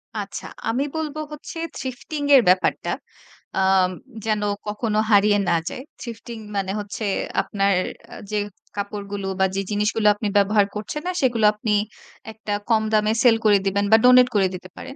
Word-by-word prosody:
আচ্ছা, - - -5 0.2
আমি 245 +5 0
বলব 310 -2 -3 0.2
হচ্ছে 300 +3 -9 0.2
থ্রিফটিং 265 +4 -5
এর 265 - +8
ব্যাপারটা। 185 0 +2 0.7
আম 190 -1 +4 0.4
যেন 215 -1 0 0.3
কখনো 210 +1 -1
হারিয়ে 205 0 +5
না - - +3
যায়। 255 - -7 0.2
থ্রিফটিং 235 0 -8 0.2
মানে 190 -1 -1
হচ্ছে 210 +2 -5 0.4
আপনার 200 -1 0 0.6
যে 210 - 0
অ্যা 205 - -11 0.3
কাপড়গুলো 200 -1 -4
বা 190 - +5
যে 195 - 0
জিনিসগুলো 210 +1 +1
আপনি 210 0 -3
ব্যবহার 205 +1 +4
করছেন 215 +8 -4
না 365 - +1
সেগুলো 240 -5 +2
আপনি 210 +1 -3 0.6
একটা 220 -1 -5 0.2
কম 220 -1 +3
দামে 215 0 +3
সেল 240 -3 +6
করে 205 -1 +6
দিবেন 200 +1 +1
বা 220 - +9
ডোনেট 250 0 +7
করে 195 -2 +4
দিতে 185 0 -10
পারেন, 270 - -8
210 Hz, 160 wpm, -22 LUFS, 200-235 Hz, 0.7 s, বা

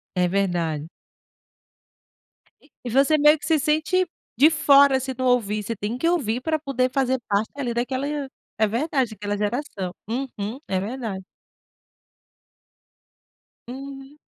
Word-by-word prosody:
É 180 0 +2
verdade. 175 -5 -1 2.0
E 245 - -4
você 275 +5 +4
meio 300 +1 +6
que 295 - -9
se 315 -2 +3
sente 315 +5 +1 0.3
de 295 +5 +7
fora 280 -3 +5
se 265 0 -4
não 255 - -1
ouvir. 215 -4 +1
Você 230 +3 -3
tem 210 +3 -3
que 330 - 0
ouvir 250 -9 0
pra 315 +2 0
poder 255 -3 0
fazer 260 -1 +1
parte 205 +2 0
ali 255 -4 -2
daquela 260 +3 -1 0.5
é 220 - +4
verdade, 260 +1 0
daquela 205 -1 -4
geração. 210 -4 -3 0.2
Uhum. 240 -2 -4
É 190 -1 0
verdade. 210 -3 -4 2.5
Uhum. 270 +2 -9
255 Hz, 130 wpm, -24 LUFS, 210-280 Hz, 2.5 s, de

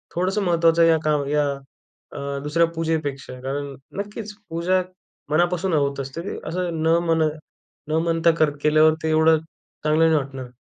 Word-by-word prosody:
थोडंसं 185 +4 0
महत्वाचं 170 -1 +3
आहे 165 0 +6
या 160 - +4
काम 150 -2 +1
या 150 -1 +2 0.6
अ, 140 0 -4
दुसऱ्या 165 +3 +2
पूजेपेक्षा, 145 -6 -3
कारण 140 +1 -4 0.2
नक्कीच 210 +1 -6 0.2
पूजा 175 +3 +1 0.5
मनापासून 175 +3 +1
होत 140 -2 +1
असते, 135 +5 -5 0.3
असं 170 -1 -2
न 165 +1 +4
म्हण 165 -1 +2 0.7
न 155 - -3
म्हणता 165 0 +3
कर 155 -1 +4
केल्यावर 155 +1 +5
ते 160 - 0
एवढं 160 0 +4 0.5
चांगलं 155 +2 +3
नाही 160 - +3
वाटणार. 135 -2 -5
160 Hz, 150 wpm, -23 LUFS, 145-170 Hz, 0.7 s, आहे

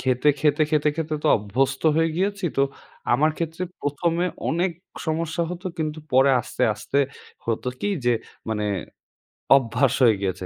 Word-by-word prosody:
খেতে, 130 +2 +2
খেতে, 150 +1 +3
খেতে, 150 -1 +3
খেতে 160 -1 -2
তো - - 0
অভ্যস্ত 130 +6 -1
হয়ে 165 0 +3
গিয়েছি। 195 +1 -1
তো, 135 - +4 0.5
আমার 150 +6 +4
ক্ষেত্রে 165 +1 -3 0.2
১ম 145 +4 0
এ - - +1 0.2
অনেক 175 +3 +1 0.4
সমস্যা 165 +1 -1
হতো 180 +2 -6
কিন্তু 155 -1 -2
পরে 135 +2 +6
আস্তে, - - -5
আস্তে, 115 +6 -2 0.5
হতো 115 +2 -1
কি? - - 0 0.2
যে 120 - +4 0.4
মানে 105 -1 -1 0.9
অভ্যাস 130 0 +1
হয়ে 115 -3 +6
গিয়েছে। 95 -1 -2
150 Hz, 155 wpm, -24 LUFS, 125-165 Hz, 0.9 s, পরে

